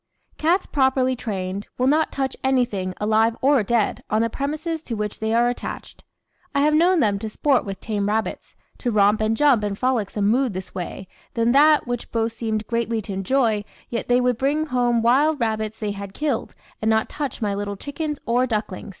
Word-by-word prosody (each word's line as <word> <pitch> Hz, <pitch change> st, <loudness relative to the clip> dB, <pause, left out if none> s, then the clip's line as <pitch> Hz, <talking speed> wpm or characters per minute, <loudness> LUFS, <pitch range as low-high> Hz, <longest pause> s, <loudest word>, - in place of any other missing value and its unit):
Cats, 345 Hz, +5 st, +2 dB
properly 265 Hz, -2 st, +2 dB
trained, 200 Hz, -4 st, -4 dB
will 250 Hz, -, +1 dB
not 305 Hz, +4 st, +3 dB
touch 265 Hz, -1 st, -2 dB
anything, 240 Hz, -9 st, 0 dB
alive 220 Hz, +2 st, +2 dB
or 275 Hz, -1 st, +4 dB
dead, 220 Hz, +1 st, 0 dB
on 215 Hz, +1 st, +2 dB
the 230 Hz, -, -1 dB
premises 310 Hz, +5 st, -3 dB
to 240 Hz, -7 st, -5 dB
which 210 Hz, -1 st, -4 dB
they 220 Hz, 0 st, -1 dB
are 235 Hz, +1 st, +3 dB
attached. 245 Hz, -, -6 dB, 0.5 s
I 280 Hz, -, +3 dB
have 300 Hz, +1 st, +3 dB
known 340 Hz, +2 st, +4 dB
them 205 Hz, -4 st, +2 dB
to 220 Hz, -, -4 dB
sport 270 Hz, +4 st, +1 dB
with 195 Hz, -2 st, -5 dB
tame 205 Hz, -2 st, -2 dB
rabbits, 220 Hz, +1 st, -3 dB, 0.2 s
to 245 Hz, -, -1 dB
romp 210 Hz, -1 st, +3 dB
and 220 Hz, +1 st, +1 dB
jump 270 Hz, -6 st, +4 dB
in 205 Hz, -1 st, -1 dB
frolicsome 215 Hz, -4 st, 0 dB
mood 240 Hz, -1 st, +2 dB
this 185 Hz, 0 st, -6 dB
way, 185 Hz, +1 st, -6 dB, 0.3 s
then 230 Hz, 0 st, +2 dB
that, 300 Hz, +3 st, +5 dB
which 245 Hz, -1 st, -4 dB
both 225 Hz, 0 st, 0 dB
seemed 220 Hz, -2 st, -2 dB
greatly 230 Hz, 0 st, -1 dB
to 200 Hz, -, -6 dB
enjoy, 215 Hz, +2 st, +1 dB, 0.3 s
yet 235 Hz, -, -3 dB
they 245 Hz, 0 st, +4 dB
would 250 Hz, -2 st, +1 dB
bring 290 Hz, +3 st, +1 dB
home 245 Hz, -4 st, +1 dB
wild 285 Hz, +6 st, +3 dB
rabbits 220 Hz, -2 st, -2 dB
they 210 Hz, -2 st, -2 dB
had 200 Hz, -1 st, -7 dB
killed, 290 Hz, -6 st, -2 dB, 0.3 s
and 220 Hz, -, +1 dB
not 220 Hz, 0 st, +2 dB
touch 285 Hz, -4 st, -4 dB
my 210 Hz, -4 st, -1 dB
little 200 Hz, 0 st, -3 dB
chickens 295 Hz, +4 st, -4 dB
or 245 Hz, +2 st, +2 dB
ducklings. 210 Hz, -5 st, -3 dB
230 Hz, 195 wpm, -23 LUFS, 210-265 Hz, 0.5 s, that